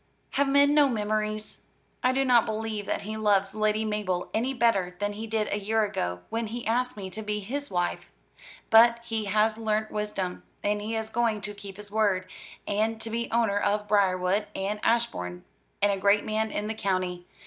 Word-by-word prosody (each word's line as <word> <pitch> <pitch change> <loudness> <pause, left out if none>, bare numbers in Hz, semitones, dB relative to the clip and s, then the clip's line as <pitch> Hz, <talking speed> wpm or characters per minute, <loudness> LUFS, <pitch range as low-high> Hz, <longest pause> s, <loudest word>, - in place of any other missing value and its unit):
Have 280 0 +2
men 285 +1 +5
no 295 -2 +5
memories? 215 -1 -2 0.3
I 255 - +3
do 270 +1 +1
not 240 -2 +5
believe 215 -2 -3
that - - -2
he 215 +2 -5
loves 200 -2 +2
Lady 215 0 +1
Mabel 205 -4 -2
any 240 +4 0
better 215 -8 +1
than 205 0 -1
he 220 +2 -6
did 220 -1 0
a 205 - 0
year 220 +2 +1
ago, 90 - -2
when 230 0 -1
he 235 +2 -5
asked 250 +1 0
me 190 -2 -6
to 220 - -6
be 210 0 -2
his 275 +8 -4
wife. 175 -2 -2 0.6
But 235 +1 +7
he 225 -2 -2
has 215 +2 +2
learnt 215 -1 0
wisdom; 210 -4 -3 0.2
and 205 0 0
he 220 +2 -3
is 220 0 -3
going 225 -2 +1
to 205 +1 -3
keep 200 -1 -9
his 205 -1 -10
word, 200 -4 +1 0.4
and 220 +2 0
to 225 0 -5
be 235 +1 -2
owner 225 -3 +2
of 210 +1 0
Briarwood 195 0 +2
and 200 +2 -2
Ashbourne, 90 - 0 0.4
and 205 - +5
a 195 - 0
great 200 +2 +3
man 220 +1 0
in 210 0 -3
the 220 - -2
county. 185 -4 -2
215 Hz, 195 wpm, -27 LUFS, 200-225 Hz, 0.6 s, But